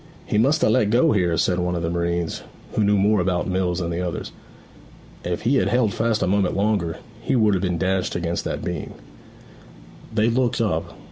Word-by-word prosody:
'He 105 - 0
must 145 +7 +3
ha' - - +5
let 120 -5 +3
go 120 +4 +4
here,' 90 -6 +1
said 90 -1 +1
one 90 0 -1
of 85 - -3
the 85 - -1
marines, 85 0 -2 0.3
who 110 - +1
knew 105 0 +3
more 105 +2 +3
about 90 -1 0
mills 90 -2 0
than 85 -2 -2
the 85 +1 -2
others. 90 -2 -4 0.9
'If 85 0 -3
he 135 +4 +3
had - - +2
held 120 -4 +2
fast 115 -1 0
a - - 0
moment 95 -1 +1
longer, 100 -5 0 0.2
he 115 - 0
would 110 -4 +3
have 95 - 0
been 90 -3 -1
dashed 95 +1 -1
against 85 0 -2
that - - -3
beam.' 85 -4 -5 1.2
They 110 0 +2
looked 125 0 +1
up. 90 -8 -1
95 Hz, 205 wpm, -22 LUFS, 85-110 Hz, 1.2 s, ha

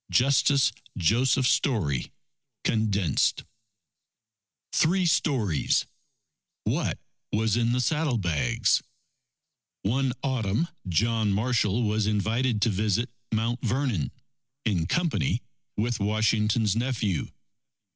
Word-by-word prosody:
Justice 135 0 +3 0.3
Joseph 125 - +2
Story 95 - +1 0.5
(Condensed) 100 - +1 1.3
THREE 180 +3 +3
STORIES 125 - +1 0.8
What - - -1 0.3
was 110 0 +1
in 120 0 +1
the 125 - +1
Saddlebags 120 - +1 1.0
One 130 +6 +1
Autumn, 130 - 0 0.2
John 110 +4 +1
Marshall 110 +1 +1
was 105 -1 0
invited 110 +2 0
to - - +3
visit 105 +4 0 0.2
Mount 115 +2 -1
Vernon, 120 - 0 0.6
in 90 -7 0
company 165 - 0 0.3
with 115 +2 0
Washington's 105 0 +1
nephew. 115 -7 -1
110 Hz, 85 wpm, -26 LUFS, 105-125 Hz, 1.3 s, Justice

